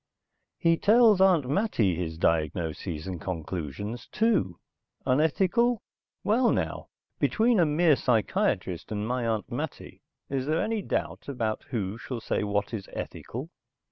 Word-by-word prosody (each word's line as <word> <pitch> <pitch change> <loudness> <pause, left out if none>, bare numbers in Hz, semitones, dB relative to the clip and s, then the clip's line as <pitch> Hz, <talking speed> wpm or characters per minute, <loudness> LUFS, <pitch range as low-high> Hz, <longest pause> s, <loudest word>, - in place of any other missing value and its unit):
He 165 0 +3
tells 215 -1 +5
Aunt 180 -8 +5
Mattie 140 - +1
his 80 -2 -4
diagnoses 80 0 -1
and 95 -3 -5
conclusions, 90 - -5
too. 205 - +1 0.5
Unethical? 185 - +2 0.4
Well 235 +3 +3
now! - - -2 0.3
Between 230 -1 +3
a 170 - +5
mere 155 +1 +4
psychiatrist 105 -7 0
and 105 0 -2
my 125 -1 -1
Aunt 110 -3 -2
Mattie - - -5 0.3
is 135 -1 -2
there 155 +2 +1
any 220 -1 0
doubt - - -3
about 115 -5 -2
who 105 -2 -3
shall 125 -2 -5
say 110 - -1
what 100 +1 -1
is 100 -4 -5
ethical? 135 +9 -6
125 Hz, 135 wpm, -27 LUFS, -, 0.5 s, tells